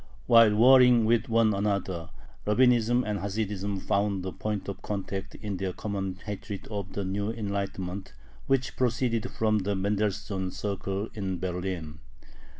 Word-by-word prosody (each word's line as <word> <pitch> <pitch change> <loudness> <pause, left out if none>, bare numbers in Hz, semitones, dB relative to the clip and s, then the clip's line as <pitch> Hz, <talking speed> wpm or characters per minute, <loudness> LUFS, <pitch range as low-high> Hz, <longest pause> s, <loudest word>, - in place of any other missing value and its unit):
While 115 -3 +6
warring 125 0 +7
with 115 +1 +2
one 115 -1 +4
another, 100 -4 -1 0.4
Rabbinism 120 +1 +4
and 105 -1 -2
Hasidism 100 -1 -2
found 100 -2 0
a 95 - -3
point 105 0 -4
of 100 - -5
contact 100 -1 -4
in 105 -3 -4
their 95 0 -2
common 95 -2 -3
hatred 100 -1 -6
of 100 -3 -4
the 100 - -3
new 100 +2 -2
Enlightenment, 100 -3 -4 0.4
which 135 -2 +1
proceeded 120 -2 0
from 110 -1 +1
the 100 +1 -1
Mendelssohn 100 -1 -1
circle 100 +1 -3
in 95 -3 -3
Berlin. 90 -3 -4
100 Hz, 140 wpm, -28 LUFS, 95-110 Hz, 0.4 s, warring